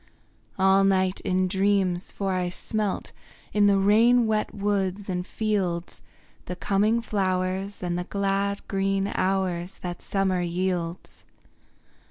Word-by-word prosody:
All 195 +1 +4
night 190 -1 +2
in 185 0 +1
dreams, 190 -1 +1
for 195 -1 -2
I 180 -1 0
smelt, 210 +2 -2 0.4
In 205 -1 +4
the 200 -1 +4
rain 225 +5 +5
wet 215 -1 0
woods 200 -1 -1
and 180 0 -2
fields, 190 -6 -2 0.5
The 180 - -4
coming 205 +6 +1
flowers 190 -1 -1
and 175 0 -1
the 180 - -4
glad 200 +1 -1
green 195 0 0
hours 185 -1 -1
That 175 -1 -5
summer 190 -2 0
yields. 175 0 -3
195 Hz, 125 wpm, -26 LUFS, 185-200 Hz, 0.5 s, rain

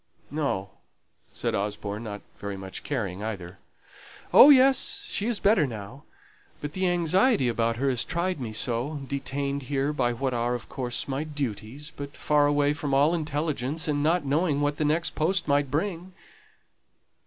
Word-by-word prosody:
"No," 135 -11 -2 0.6
said - - -2
Osborne, 105 +2 -3
not 105 -2 -6 0.2
very 100 -1 -5
much 95 0 -7
caring 100 -10 -3
either. 95 -4 -6 0.7
"Oh, 280 - +10
yes, 265 -1 +5
she 205 - 0
is 240 -3 +1
better 195 -8 +3
now; 115 +3 -8 0.5
but 145 0 -6
the 185 -1 +1
anxiety 175 - +3
about 115 0 +1
her 135 +4 -1
has 125 -2 +2
tried 175 -1 -2
me 115 -3 -4
so: 125 +6 -1
detained 140 +1 -3
here 140 +1 0
by 125 -4 +1
what 130 +2 -2
are, 120 +1 0
of 120 - -8
course, 125 -2 -1
my 135 +2 -2
duties, 140 -1 -5
but 140 0 -8
far 145 -1 +3
away 145 0 +2
from 145 -2 -2
all 145 +4 +4
intelligence, 150 -2 -2
and 145 -1 0
not 165 +1 +2
knowing 145 +1 +1
what 145 0 0
the 155 - 0
next 160 +3 +1
post 170 +3 0
might 140 -1 +2
bring." 175 +4 -3
140 Hz, 165 wpm, -26 LUFS, 120-155 Hz, 0.7 s, Oh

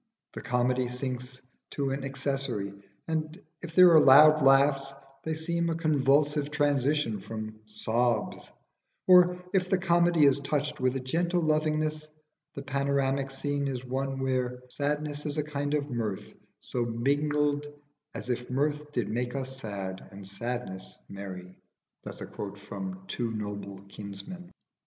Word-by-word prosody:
The - - -6
comedy 125 0 +1
sinks 125 0 -4 0.3
to 140 -2 -1
an 135 0 -3
accessory, 135 -7 -2 0.3
and 160 +1 -2 0.2
if 165 -2 -8
there 180 -1 +9
are 160 - +8
loud 150 +3 +8
laughs 135 0 +4 0.3
they 160 0 -2
seem 170 +1 -1
a 165 - 0
convulsive 150 -2 +2
transition 145 -5 +1
from 110 +1 -7
sobs; 115 +3 -1 0.5
or 180 -1 +7 0.2
if 185 -2 +2
the 190 - +3
comedy 170 -3 +4
is 140 0 +4
touched 145 +1 -2
with 130 0 +1
a - - 0
gentle 170 +7 0
lovingness, 155 0 0 0.5
the 140 - -6
panoramic 140 -1 0
scene 140 +1 -2
is 130 -2 -4
one 135 +1 -2
where 125 -1 -1
"Sadness 150 +2 -2
is 145 +1 -3
a 150 - +1
kind 145 0 -2
of 145 -1 -2
mirth 110 -5 -3 0.3
So 120 - -2
mingled 145 +5 0 0.5
as 125 - -3
if 125 0 -3
mirth 145 +3 -1
did 120 -6 0
make 120 +3 -2
us 135 -1 -3
sad 100 -5 -5
And 95 0 -8
sadness 110 -2 -5
merry." 95 -2 -8 0.5
[Footnote 105 -1 -7
1: 190 0 -5
Two 125 - -3
Noble 100 -2 -6
Kinsmen. 100 - -9
135 Hz, 140 wpm, -29 LUFS, 125-150 Hz, 0.5 s, there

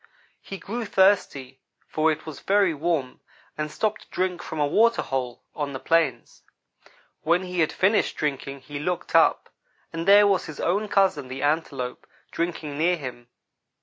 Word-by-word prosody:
He 195 - -8
grew 230 +5 -5
thirsty, 185 -10 +2 0.3
for 155 +1 +2
it 155 - -5
was 155 -3 -8
very 195 -3 +2
warm, 150 -4 -2 0.4
and 150 0 -4
stopped 215 +4 -1
to - - -18
drink 180 -1 -2
from 160 - -6
a 145 - +3
water 230 +10 +3
hole 125 -2 -4
on 145 -2 -4
the 130 - -5
plains. 155 -8 0 0.8
When 170 +3 +2
he 180 -1 -4
had 160 - +2
finished 200 +3 +1
drinking 140 -2 -3
he 145 +1 -7
looked 175 +3 -3
up, - - +3 0.4
and 165 +2 -4
there 205 +1 +8
was 195 -3 +1
his 155 - -9
own 200 +5 0
cousin, 190 -9 +2
the 130 +2 -6
Antelope, 145 -4 -2 0.2
drinking 160 -4 -3
near 175 +2 +2
him. 125 -5 -8
160 Hz, 165 wpm, -25 LUFS, 140-190 Hz, 0.8 s, there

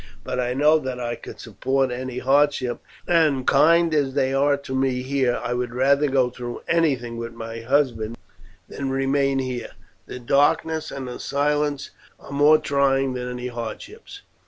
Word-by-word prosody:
But 125 - -3
I 125 0 -1
know 150 +3 +4
that 130 -3 -5
I 120 -1 -3
could - - -10
support 135 -1 -1
any 125 0 -5
hardships; 135 -1 +1 0.3
and 155 -7 +2
kind 170 +1 +4
as 140 -3 0
they 135 -1 +1
are 140 +1 +2
to 140 -1 -8
me 130 -1 0
here, 130 -2 0
I 120 0 -2
would 125 -1 -3
rather 140 +3 +3
go 130 -2 +2
through 120 -1 -7
anything 135 -9 0
with 115 0 -6
my 115 0 -7
husband 120 -3 0 0.5
than 140 -1 -5
remain 135 +1 +1
here; 130 -2 -4 0.3
the - - -7
darkness 145 +5 +1
and 135 -2 -6
the 125 - -7
silence 145 0 -1 0.3
are - - -13
more 145 +2 +5
trying 135 -3 +1
than 125 0 -4
any 125 0 -5
hardships. 125 - -8
135 Hz, 165 wpm, -23 LUFS, 125-145 Hz, 0.5 s, more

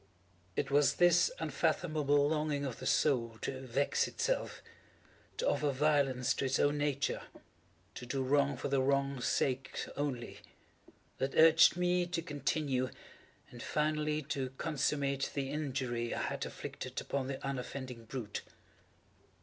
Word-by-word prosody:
It - - -1
was 145 0 +4
this 175 - +5
unfathomable 145 -4 +1
longing 150 -2 0
of 130 -4 -5
the - - -4
soul 130 -5 +2
to 130 -1 -3
vex 135 +2 +1
itself—to - - -5
offer 150 - +1
violence 135 -3 +2
to - - -2
its 130 0 +1
own 145 +1 +2
nature—to 140 -3 -5
do 135 +1 -1
wrong 140 0 +2
for - - -3
the 135 -1 +2
wrong's 140 -1 +1
sake 130 -1 -1
only—that 135 0 -6
urged 160 +2 +7
me 180 0 +2
to 175 -1 -2
continue 140 -3 -1 0.6
and 120 - -10
finally 150 0 0
to 135 -2 -3
consummate 140 -3 0
the 135 -1 -2
injury 130 -5 -2
I - - -2
had - - -2
inflicted - - -6
upon 135 -2 -2
the 135 0 -3
unoffending 130 -3 -5
brute. 115 -3 -5
140 Hz, 125 wpm, -33 LUFS, 130-150 Hz, 0.6 s, urged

